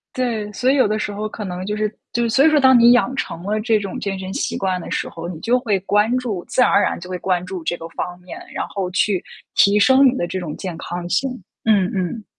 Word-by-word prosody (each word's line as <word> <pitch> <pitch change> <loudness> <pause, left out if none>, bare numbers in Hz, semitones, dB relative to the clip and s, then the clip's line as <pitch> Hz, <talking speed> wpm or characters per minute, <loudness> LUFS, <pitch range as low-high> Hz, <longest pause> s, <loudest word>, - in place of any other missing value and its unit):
对， 230 -5 -1
所 255 +5 +2
以 - - +2
有 260 -6 +4
的 215 - 0
时 210 - -3
候 210 +1 -3
可 215 0 -7
能 180 -1 -5
就 210 - -2
是 215 0 -1 0.2
就 235 0 +1
所 270 +6 +4
以 - - +7
说， 310 - +3
当 260 -2 +6
你 240 +1 +7
养 245 +1 +2
成 165 +1 -4
了 210 +2 -1
这 225 0 +2
种 200 -3 -5
健 195 -1 -3
身 190 0 -6
习 - - -2
惯 185 -2 -1
的 - - -8
时 - - -2
候， 165 0 -7
你 175 -2 -6
就 245 +2 +2
会 215 -6 0
关 210 +5 +2
注 215 -8 -3
自 - - +1
然 - - +4
而 200 - +5
然 - - 0
就 180 +2 -10
会 180 - -3
关 180 -1 -1
注 185 -1 -6
这 175 - 0
个 165 - -9
方 175 +1 -5
面， 180 - -9
然 - - -2
后 195 -3 -3
去 190 0 +1 0.3
提 200 +1 +5
升 260 +6 +6
你 255 - +2
的 175 - -1
这 185 - -4
种 165 -4 -5
健 180 -4 -5
康 175 +1 -5
性， 260 +10 +1 0.4
嗯 200 -4 +3
嗯。 195 +3 -3
205 Hz, 290 characters per minute, -20 LUFS, 180-235 Hz, 0.4 s, 以